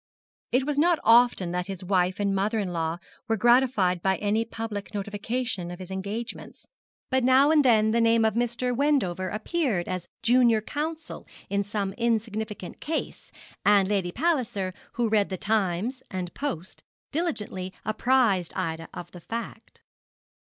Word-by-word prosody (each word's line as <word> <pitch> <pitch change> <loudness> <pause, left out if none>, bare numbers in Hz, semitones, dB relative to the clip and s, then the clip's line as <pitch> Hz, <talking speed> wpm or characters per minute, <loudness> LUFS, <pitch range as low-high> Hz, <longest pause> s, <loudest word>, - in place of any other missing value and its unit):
It 255 +2 +2
was 290 -1 0
not 340 +2 +4
often 230 -6 +5
that 180 +1 -2
his 195 -1 -6
wife 185 0 +1
and 200 -1 +1
mother 205 +4 0
in 195 -4 -2
law 165 0 -1 0.3
were 225 -1 +1
gratified 235 -7 +3
by 190 +1 +1
any 210 +2 +1
public 220 -2 -6
notification 205 -1 -3
of 175 - -7
his 185 0 -9
engagements; 205 +5 -6 0.5
but 260 -1 +2
now 265 +4 +5
and 305 -2 +5
then 220 -4 +4
the 230 +1 +2
name 230 0 +4
of 220 - +2
Mr. 240 +2 -1
Wendover 225 -11 +1
appeared 215 - -1
as 185 -2 -4 0.2
junior 235 -1 +5
counsel 310 +7 -5 0.2
in 200 0 +1
some 200 -1 -3
insignificant 220 -4 -2
case, 315 +1 -4 0.3
and 200 -2 +5
Lady 195 -3 0
Palliser, 240 - 0 0.2
who 235 -1 0
read 215 -2 +2
the 190 - -3
Times 215 +5 -1
and 180 -2 -5
Post, 185 - -5 0.3
diligently 210 - -3
apprised 215 -5 +2
Ida 165 0 -3
of 175 0 -8
the 175 - -11
fact. 230 +6 -7
215 Hz, 150 wpm, -26 LUFS, 190-245 Hz, 0.5 s, often